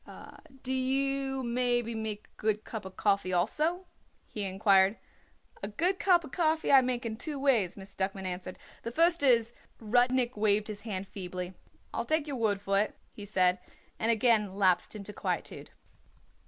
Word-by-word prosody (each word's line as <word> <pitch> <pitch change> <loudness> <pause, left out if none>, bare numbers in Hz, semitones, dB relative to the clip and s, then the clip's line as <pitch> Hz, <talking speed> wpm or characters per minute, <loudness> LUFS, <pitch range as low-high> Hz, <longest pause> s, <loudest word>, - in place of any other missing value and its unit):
"Do 260 - -1
you 270 +1 0
make 240 0 +1
maybe 220 -1 -3
a 210 0 -8 0.2
good 215 0 0
cup 190 -4 -7
coffee 200 -3 +1
also?" 305 - 0 0.4
he 210 -2 -4
inquired. 195 +1 +3 0.6
"A 200 - -3
good 355 - 0
cup 350 -8 +3
coffee 320 -1 +1
I 270 -1 +8
make 250 -1 -2
in 220 -1 -3
two 295 +4 -4
ways," 235 -10 +2
Miss 195 0 -11
Duckman 190 0 -3
answered. 185 0 -5 0.2
"The 230 - -5
first 335 +5 +3
is 235 -4 +4 0.2
" - - -38
Rudnik 245 +2 +2
waved 210 0 +1
his 205 -1 -4
hand 200 -3 -5
feebly. 180 -1 -6 0.4
"I'll - - -2
take 315 -1 +1
your 285 -3 -4
word 215 -4 +1
for 195 0 +1
it," 210 - -1 0.2
he 205 - -9
said, 185 -3 +2 0.4
and 225 - 0
again 220 -4 +3
lapsed 190 0 +2
into 210 0 -7
quietude. - - -4
220 Hz, 165 wpm, -30 LUFS, 200-260 Hz, 0.6 s, I